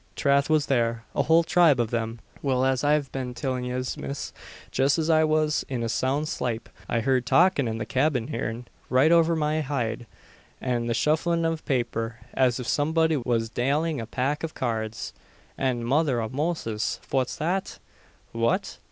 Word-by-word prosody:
"Trath 140 Hz, +1 st, +2 dB
was 155 Hz, -2 st, +3 dB
there 115 Hz, -3 st, 0 dB
a -, -, +2 dB
whole 165 Hz, +1 st, +4 dB
tribe 165 Hz, -5 st, +4 dB
av 115 Hz, -2 st, 0 dB
thim. 115 Hz, -1 st, -2 dB, 0.2 s
Well, 130 Hz, -2 st, +1 dB
as 130 Hz, 0 st, +1 dB
I've 145 Hz, -2 st, +2 dB
been 125 Hz, -2 st, -4 dB
tillin' 125 Hz, 0 st, -2 dB
yez, 125 Hz, +1 st, -3 dB
miss, 140 Hz, +1 st, -5 dB, 0.4 s
jest 135 Hz, +3 st, +2 dB
as 160 Hz, 0 st, +1 dB
I 160 Hz, 0 st, +5 dB
wus 155 Hz, -1 st, +2 dB
in 125 Hz, -3 st, -2 dB
a 115 Hz, -, -1 dB
soun' 135 Hz, +6 st, 0 dB
slape, 120 Hz, -6 st, -3 dB, 0.2 s
I 115 Hz, -, +1 dB
heerd 130 Hz, +1 st, +1 dB
talkin' 175 Hz, -7 st, +4 dB
in 110 Hz, 0 st, -2 dB
the 110 Hz, -, -3 dB
cyabin 130 Hz, -3 st, 0 dB
heern, 115 Hz, +1 st, -4 dB, 0.2 s
right 135 Hz, +5 st, +4 dB
over 165 Hz, 0 st, +5 dB
my 155 Hz, 0 st, 0 dB
hid, 120 Hz, -5 st, -3 dB, 0.5 s
an 120 Hz, -2 st, -1 dB
the 115 Hz, -, 0 dB
shufflin' 160 Hz, +6 st, +1 dB
av 165 Hz, -1 st, -1 dB
paper, 120 Hz, -4 st, -1 dB, 0.2 s
as 130 Hz, -2 st, +2 dB
if 125 Hz, -, -5 dB
somebody 160 Hz, +2 st, +2 dB
was 115 Hz, -4 st, -1 dB
dalin' 145 Hz, +6 st, 0 dB
a 115 Hz, -, -6 dB
pack 140 Hz, +6 st, -1 dB
av 165 Hz, -, -4 dB
cards, 110 Hz, -3 st, -3 dB, 0.4 s
an 125 Hz, -3 st, -1 dB
Mother 135 Hz, 0 st, +2 dB
av 110 Hz, +2 st, -4 dB
Moses! 140 Hz, -8 st, -2 dB
fwhat's 130 Hz, -2 st, 0 dB
that?" 180 Hz, +5 st, -2 dB, 0.5 s
"What?" 115 Hz, 0 st, -1 dB
130 Hz, 175 wpm, -26 LUFS, 120-155 Hz, 0.5 s, I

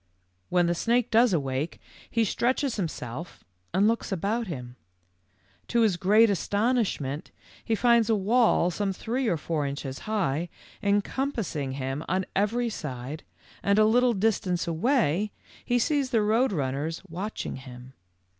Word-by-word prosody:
"When 180 Hz, -1 st, +3 dB
the 170 Hz, -, +2 dB
snake 235 Hz, +6 st, +1 dB
does 230 Hz, +1 st, +5 dB
awake, 140 Hz, -1 st, -1 dB, 0.3 s
he 230 Hz, -, +2 dB
stretches 250 Hz, +4 st, 0 dB
himself 160 Hz, -, -5 dB, 0.3 s
and 195 Hz, +4 st, +3 dB
looks 230 Hz, -1 st, 0 dB
about 205 Hz, +5 st, -1 dB
him. 125 Hz, -7 st, -6 dB, 0.9 s
To 235 Hz, -, +2 dB
his 215 Hz, -5 st, +3 dB
oreat 210 Hz, +4 st, +5 dB
astonishment 200 Hz, -, 0 dB, 0.3 s
he 225 Hz, -, 0 dB
finds 235 Hz, 0 st, +4 dB
a 225 Hz, -, +4 dB
wall 210 Hz, -3 st, +3 dB
some 195 Hz, +2 st, -1 dB
three 240 Hz, +6 st, -2 dB
or 175 Hz, -, +1 dB
four 155 Hz, 0 st, -2 dB
inches 140 Hz, -1 st, -5 dB
high 175 Hz, -6 st, 0 dB, 0.3 s
encompassing 205 Hz, -, -1 dB
him 135 Hz, +2 st, -3 dB
on 185 Hz, +1 st, 0 dB
every 230 Hz, +5 st, +1 dB
side, 145 Hz, -, -5 dB, 0.4 s
and 200 Hz, 0 st, +2 dB
a 215 Hz, -, +6 dB
little 245 Hz, +2 st, +4 dB
distance 190 Hz, -4 st, 0 dB
away 205 Hz, -, +1 dB, 0.3 s
he 245 Hz, -, +1 dB
sees 275 Hz, +2 st, +1 dB
the 225 Hz, -4 st, +2 dB
Road 225 Hz, +5 st, +2 dB
Runners 145 Hz, 0 st, -2 dB
watching 190 Hz, +1 st, -5 dB
him. 130 Hz, -1 st, -11 dB
200 Hz, 140 wpm, -27 LUFS, 155-230 Hz, 0.9 s, a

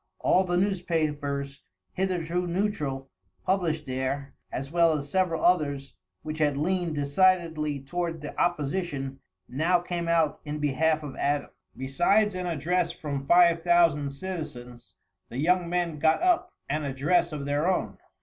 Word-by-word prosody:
All 185 Hz, -, +3 dB
the 175 Hz, -1 st, 0 dB
newspapers, 150 Hz, -7 st, -1 dB, 0.3 s
hitherto 180 Hz, -2 st, -1 dB
neutral, 150 Hz, -8 st, -2 dB, 0.3 s
published 165 Hz, -5 st, 0 dB
there, 130 Hz, +1 st, -3 dB, 0.2 s
as 135 Hz, +2 st, -5 dB
well 165 Hz, -2 st, +4 dB
as 145 Hz, 0 st, -7 dB
several 185 Hz, -4 st, +1 dB
others 145 Hz, -6 st, +1 dB, 0.3 s
which 155 Hz, 0 st, -5 dB
had 145 Hz, -2 st, +2 dB
leaned 175 Hz, +1 st, 0 dB
decidedly 155 Hz, -1 st, +2 dB
toward 170 Hz, +3 st, -3 dB
the 150 Hz, -, -7 dB
opposition, 145 Hz, -4 st, -1 dB, 0.3 s
now 160 Hz, +8 st, +2 dB
came 175 Hz, -1 st, -4 dB
out 165 Hz, -3 st, +2 dB
in 150 Hz, 0 st, -4 dB
behalf 150 Hz, +2 st, +1 dB
of 140 Hz, -3 st, -7 dB
Adams. 145 Hz, 0 st, 0 dB, 0.3 s
Besides 175 Hz, +11 st, +2 dB
an 180 Hz, -1 st, -3 dB
address 170 Hz, +2 st, 0 dB
from 140 Hz, -4 st, -5 dB
five 170 Hz, -1 st, +5 dB
thousand 165 Hz, -5 st, +3 dB
citizens, 125 Hz, -, -7 dB, 0.3 s
the 120 Hz, -, -7 dB
young 175 Hz, +4 st, +2 dB
men 175 Hz, -3 st, -1 dB
got 160 Hz, -, +3 dB
up 360 Hz, 0 st, +2 dB, 0.2 s
an 150 Hz, +2 st, -1 dB
address 150 Hz, +6 st, +1 dB
of 145 Hz, -2 st, -5 dB
their 145 Hz, +3 st, 0 dB
own. 100 Hz, -, -2 dB
155 Hz, 140 wpm, -27 LUFS, 140-175 Hz, 0.3 s, five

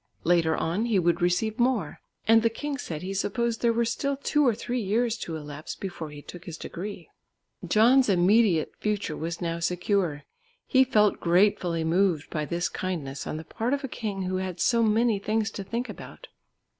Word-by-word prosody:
Later 165 Hz, -1 st, +3 dB
on 180 Hz, +8 st, -1 dB
he 230 Hz, -4 st, +2 dB
would 175 Hz, -1 st, +2 dB
receive 210 Hz, +6 st, +1 dB
more, 245 Hz, -2 st, +1 dB, 0.3 s
and 225 Hz, 0 st, +6 dB
the 230 Hz, -, +3 dB
king 280 Hz, +4 st, -4 dB
said 160 Hz, -, -5 dB
he 190 Hz, +1 st, -4 dB
supposed 225 Hz, +4 st, -1 dB
there 235 Hz, -, +3 dB
were 235 Hz, +1 st, +1 dB
still 275 Hz, +4 st, -1 dB
two 295 Hz, 0 st, +2 dB
or 235 Hz, -, +3 dB
three 240 Hz, +2 st, -3 dB
years 225 Hz, +3 st, +1 dB
to 165 Hz, -, -5 dB
elapse 150 Hz, -1 st, -7 dB
before 175 Hz, -5 st, -6 dB
he 145 Hz, -1 st, -10 dB
took 175 Hz, 0 st, -11 dB
his 170 Hz, -3 st, -7 dB
degree. 190 Hz, -1 st, -7 dB, 0.6 s
John's 245 Hz, +3 st, +5 dB
immediate 190 Hz, -2 st, +3 dB
future 205 Hz, -6 st, -1 dB
was 165 Hz, +3 st, -4 dB
now 170 Hz, -1 st, -2 dB
secure. 175 Hz, -3 st, 0 dB, 0.4 s
He 260 Hz, 0 st, +5 dB
felt 210 Hz, -5 st, +3 dB
gratefully 175 Hz, -2 st, +2 dB
moved 170 Hz, -1 st, +1 dB
by 155 Hz, -2 st, -2 dB
this 170 Hz, +2 st, -1 dB
kindness 145 Hz, -8 st, -4 dB
on -, -, -3 dB
the 160 Hz, -, -6 dB
part 240 Hz, -, -1 dB
of 285 Hz, -, -7 dB
a -, -, -2 dB
king 210 Hz, -6 st, -4 dB
who 185 Hz, 0 st, -1 dB
had 185 Hz, -2 st, -4 dB
so 235 Hz, -1 st, +3 dB
many 225 Hz, -1 st, +3 dB
things 215 Hz, +1 st, -1 dB
to 200 Hz, -, -6 dB
think 235 Hz, +6 st, -3 dB
about. -, -, -10 dB
195 Hz, 190 wpm, -27 LUFS, 170-230 Hz, 0.6 s, and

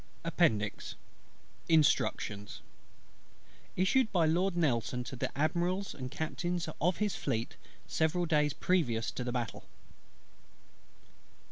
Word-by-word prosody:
APPENDIX. 115 Hz, -, +1 dB, 0.7 s
INSTRUCTIONS 145 Hz, -9 st, +2 dB, 1.1 s
Issued 220 Hz, +6 st, +3 dB
by 175 Hz, -4 st, +3 dB
LORD 175 Hz, +3 st, +2 dB
NELSON 125 Hz, -6 st, +1 dB
to 130 Hz, -, -7 dB
the 125 Hz, -, -2 dB
Admirals 175 Hz, +6 st, 0 dB
and 130 Hz, -2 st, -6 dB
Captains 170 Hz, +4 st, -2 dB
of 175 Hz, +3 st, +2 dB
his 210 Hz, -2 st, 0 dB
Fleet, 115 Hz, +1 st, -2 dB, 0.3 s
several 165 Hz, +3 st, +1 dB
days 150 Hz, -2 st, +2 dB
previous 125 Hz, -13 st, +1 dB
to 125 Hz, -, -4 dB
the 125 Hz, -, -2 dB
Battle. 120 Hz, -4 st, -3 dB
160 Hz, 105 wpm, -32 LUFS, 125-180 Hz, 1.1 s, Issued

